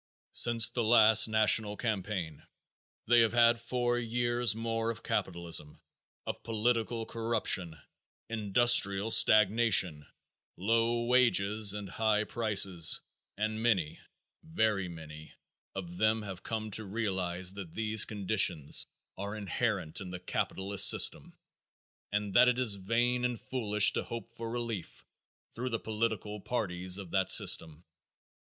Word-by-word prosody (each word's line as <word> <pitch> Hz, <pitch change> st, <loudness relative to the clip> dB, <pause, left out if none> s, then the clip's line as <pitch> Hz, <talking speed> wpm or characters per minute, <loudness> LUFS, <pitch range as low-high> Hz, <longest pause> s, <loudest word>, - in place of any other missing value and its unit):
Since 115 Hz, -3 st, +5 dB
the 120 Hz, -, -3 dB
last 110 Hz, -1 st, +6 dB
national 110 Hz, -1 st, +2 dB
campaign 95 Hz, -, -4 dB, 0.6 s
they 120 Hz, +1 st, +4 dB
have 115 Hz, -1 st, +2 dB
had 120 Hz, -1 st, +3 dB
four 120 Hz, 0 st, -2 dB
years 120 Hz, -1 st, -2 dB
more 115 Hz, 0 st, -3 dB
of 115 Hz, -, -6 dB
capitalism, 85 Hz, -4 st, -4 dB, 0.5 s
of -, -, -6 dB
political 115 Hz, 0 st, -2 dB
corruption, 110 Hz, -8 st, -2 dB, 0.5 s
industrial 110 Hz, -1 st, +2 dB
stagnation, 105 Hz, -9 st, +4 dB, 0.5 s
low 115 Hz, +4 st, 0 dB
wages 110 Hz, -4 st, +2 dB
and 105 Hz, -1 st, -7 dB
high 110 Hz, +2 st, 0 dB
prices, 100 Hz, -7 st, +2 dB, 0.4 s
and 110 Hz, +1 st, -3 dB
many, 95 Hz, -10 st, -1 dB, 0.4 s
very 110 Hz, -, -1 dB
many 80 Hz, -2 st, -12 dB, 0.4 s
of 90 Hz, -2 st, -8 dB
them 110 Hz, +1 st, 0 dB
have 95 Hz, -3 st, -8 dB
come 110 Hz, -1 st, -5 dB
to 110 Hz, -, -2 dB
realize 95 Hz, -4 st, -3 dB
that 95 Hz, -5 st, -10 dB
these 110 Hz, -1 st, +1 dB
conditions 95 Hz, -7 st, 0 dB, 0.3 s
are 100 Hz, +2 st, -5 dB
inherent 100 Hz, -5 st, -3 dB
in 95 Hz, -, -8 dB
the 90 Hz, 0 st, -7 dB
capitalist 95 Hz, +2 st, +2 dB
system -, -, +2 dB, 0.7 s
and 105 Hz, -1 st, -3 dB
that 125 Hz, -, +5 dB
it 125 Hz, -1 st, +1 dB
is 125 Hz, -5 st, +1 dB
vain 120 Hz, +5 st, -1 dB
and 125 Hz, -2 st, -2 dB
foolish 105 Hz, -5 st, +2 dB
to -, -, -1 dB
hope 115 Hz, 0 st, -9 dB
for 115 Hz, -1 st, -8 dB
relief 115 Hz, -6 st, -6 dB, 0.5 s
through 125 Hz, +2 st, -5 dB
the 115 Hz, -2 st, -3 dB
political 110 Hz, -1 st, -4 dB
parties 95 Hz, -6 st, -2 dB
of 95 Hz, -4 st, -10 dB
that 95 Hz, -1 st, 0 dB
system. 80 Hz, +1 st, +2 dB
110 Hz, 125 wpm, -30 LUFS, 95-115 Hz, 0.7 s, last